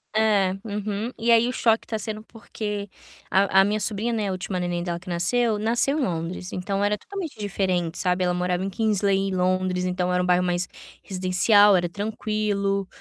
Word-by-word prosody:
É, 205 -4 +3
uhum. 210 +2 -3
E 235 +1 +2
aí 230 +1 +5
o - - -1
choque 225 -3 +2
tá 220 - -3
sendo 215 0 -5
porque 210 -3 -6 0.4
a 195 0 +4
a - - +5
minha 210 +2 0
sobrinha, 215 +2 +2
né, 215 -3 -1
a - - -1
última 185 0 -3
neném 175 -1 -2
dela 170 -1 -3
que 180 - -11
nasceu, 210 +6 +1
nasceu 240 +7 +2
em - - 0
Londres, 180 -1 -4
então 195 +2 -2
era 205 +1 +1
totalmente 385 - -7
diferente, 185 -4 -1
sabe. 180 0 0
Ela 180 0 +1
morava 180 0 -1
em 195 - -2
Kingsley, 200 -1 +1
em 190 - -3
Londres, 185 0 0
então 180 0 -1
era 180 - +2
um - - -1
bairro 180 0 +3
mais 180 0 -1 0.4
residencial, 190 +2 +4
era 175 -1 +1
tranquilo. 205 -1 -2
195 Hz, 195 wpm, -24 LUFS, 180-215 Hz, 0.4 s, aí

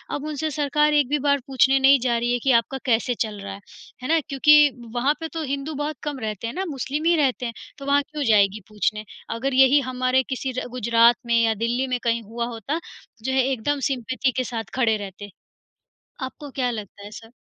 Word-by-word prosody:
अब 290 - -5
उनसे 310 +1 -3
सरकार 300 +1 +1
एक 290 -4 +3
भी 295 0 +1
बार 285 0 +2
पूछने 270 0 +3
नहीं 270 0 +6
जा 240 -1 +1
रही 240 +1 0
है 245 - 0
कि 270 - +3
आपका 265 +4 -6
कैसे 240 0 +1
चल 210 -2 -8
रहा 200 -1 -6
है? 195 - -9 0.4
है - - -3
ना, 325 +1 +3
क्योंकि 295 +1 +6 0.3
वहाँ 270 +5 +2
पर 325 - -3
तो 325 -1 -3
हिंदू 280 +2 -3
बहुत 300 0 -2
कम 290 -3 -4
रहते 215 0 -4
हैं - - -5
ना, 380 +2 -3
मुस्लिम 280 +4 -3
ही 340 0 +4
रहते 260 -4 +1
हैं, 235 - -4 0.2
तो 275 - -9
वहाँ 285 0 +3
क्यों 300 -1 -3
जाएगी 205 0 +3
पूछने 215 0 -2 0.3
अगर 265 +3 -2
यही 265 +2 +6
हमारे 255 +1 +1
किसी 260 0 -3
र - - -6
गुजरात 235 -1 +4
में 235 0 +1
या 225 -1 +3
दिल्ली 250 +3 0
में 250 -1 -1
कहीं 230 0 +1
हुआ 235 +3 -4
होता, 245 - -4 0.4
जो 265 - -1
है 265 -1 +3
एकदम 275 +4 -1
सिम्पैथी 255 +1 -1
के 255 - +1
साथ 225 -5 -5
खड़े 225 -4 +2
रहते, 205 0 -8 0.9
आपको 275 +2 -6
क्या 245 -1 +1
लगता 205 -2 -8
है 205 - -9
सर? 225 +1 -11
255 Hz, 220 wpm, -23 LUFS, 230-285 Hz, 0.9 s, नहीं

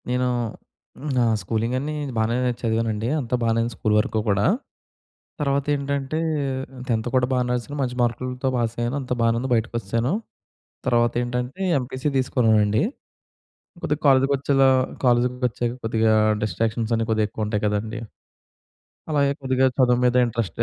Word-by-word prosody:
నేను 125 0 +1 0.9
నా 125 - +4 0.2
స్కూలింగన్నీ 120 +9 -1 0.2
బాగానే 110 +2 +1 0.2
చదివానండి 115 -1 0
అంతా 125 -2 -1
బానే 115 0 +2
ఉంది 120 0 -3
స్కూల్ 110 - 0
వరకు 110 +1 0
కూడా. 100 0 +2 1.0
తర్వాత 140 -1 +1
ఏటంటే 140 +1 -2 0.7
10థ్ 115 -2 0
కూడా 125 -1 +3
బానే 125 -1 +1
రాసాను 125 +4 -4
మంచి 125 -2 -2
మార్కులతో 125 +2 -1
పాస్ 115 -1 -1
అయ్యాను 120 +4 -1
అంత 125 - -9
బానే 115 0 +3
ఉంది 130 +2 -3
బయటికోసాను. 115 - -1 0.7
తర్వాత 120 -1 +3
ఏంటంటే 125 +7 -4 0.2
ఎంపీసీ 130 +3 -3
తీసుకున్నానండి, 110 -5 +2 1.0
కొద్దిగా 150 0 -1
కాలేజ్‌కి 135 0 +4
వచ్చేలా 135 -1 +3 0.4
కాలేజ్‌కి 125 0 +2
వచ్చాక 120 +1 -2
కొద్దిగా 110 -1 +2 0.3
డిస్ట్రాక్షన్సన్ని 115 +1 -1
కొద్దిగా 110 -1 +2
ఎక్కువ 110 +1 -3
ఉంటాయి 105 -1 -2
కదండీ! 110 +3 -2 1.1
అలాగే 140 -2 +2
కొద్దిగా 130 0 +2
చదువు 125 -2 +4
మీద 125 0 +3
ఇంట్రెస్ట్ 115 -6 -3
120 Hz, 130 wpm, -23 LUFS, 115-130 Hz, 1.1 s, నా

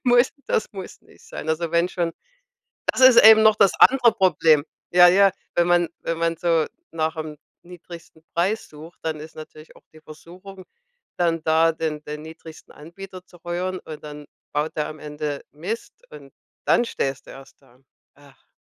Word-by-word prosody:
muss 245 0 +4
das - - 0
muss 190 -2 -9
nicht - - -22
sein. 160 - -8
Also 160 +1 -1
wenn 170 +1 +1
schon 170 -3 -3 0.8
Das - - -5
ist 260 -2 +8
eben 220 0 +8
noch 215 -1 +5
das 195 - +4
andere 250 -4 +6
Problem. 165 -7 +3 0.3
Ja, 180 0 +8
ja, 195 +2 +5 0.2
wenn 175 0 +2
man 175 -1 +2
wenn 165 - -3
man 165 0 0
so 165 -2 +1 0.2
nach 160 0 -2
'm 155 -1 -6 0.3
niedrigsten 170 -2 -13
Preis 195 +6 -1
sucht, 155 +3 -13
dann 155 -2 -4
ist 155 +1 -12
natürlich 155 0 -13
auch - - -20
die 155 - -17
Versuchung 180 +5 -13 0.5
dann 165 -2 0
da, 160 +1 +3
den 160 -2 -4
den 150 0 -7
niedrigsten 160 0 -13
Anbieter 185 +4 -12
zu 175 - -19
rühren, 180 +2 -4
und 155 -1 -11
dann 150 0 -10 0.3
baut 150 +2 -2
er 150 - -1
am 155 - -9
Ende 150 -1 -5
Mist 185 +10 -6 0.2
und 465 - -13 0.3
dann 240 - +3
stehst 135 - -4
du - - -12
erst 135 +1 -15
da. 130 -1 -25 0.3
Ach. 140 -1 -22
165 Hz, 175 wpm, -22 LUFS, 155-185 Hz, 0.8 s, ist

